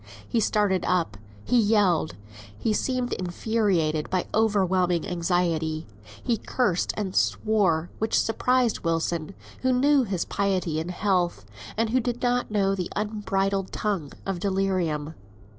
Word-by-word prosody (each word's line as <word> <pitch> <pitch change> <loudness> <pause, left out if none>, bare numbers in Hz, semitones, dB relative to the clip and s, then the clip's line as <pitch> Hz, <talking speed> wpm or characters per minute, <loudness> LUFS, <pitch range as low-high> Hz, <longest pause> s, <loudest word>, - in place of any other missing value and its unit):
He 230 - +1
started 205 -3 +2
up, 165 - +1 0.3
he 245 0 +3
yelled, 205 -7 +2 0.4
he 215 - 0
seemed 255 +2 -1
infuriated 180 -5 0
by 185 -1 0
overwhelming 185 -5 +2
anxiety. 170 -3 0 0.4
He 235 -2 +1
cursed 205 -6 0
and 195 -3 -3
swore, 190 -7 +2
which 220 - +2
surprised 250 0 +1
Wilson, 165 +1 -1 0.3
who 260 - +2
knew 275 +3 +4
his 190 -6 -2
piety 185 -5 0
in 160 +2 -4
health, 180 - 0 0.3
and 225 0 +1
who 255 - +3
did 245 0 -3
not 245 0 +1
know 200 -2 +2
the 185 -3 -3
unbridled 200 -2 -1
tongue 195 -9 -2
of 195 -2 -2
delirium. 185 -6 -1
195 Hz, 130 wpm, -26 LUFS, 175-220 Hz, 0.4 s, knew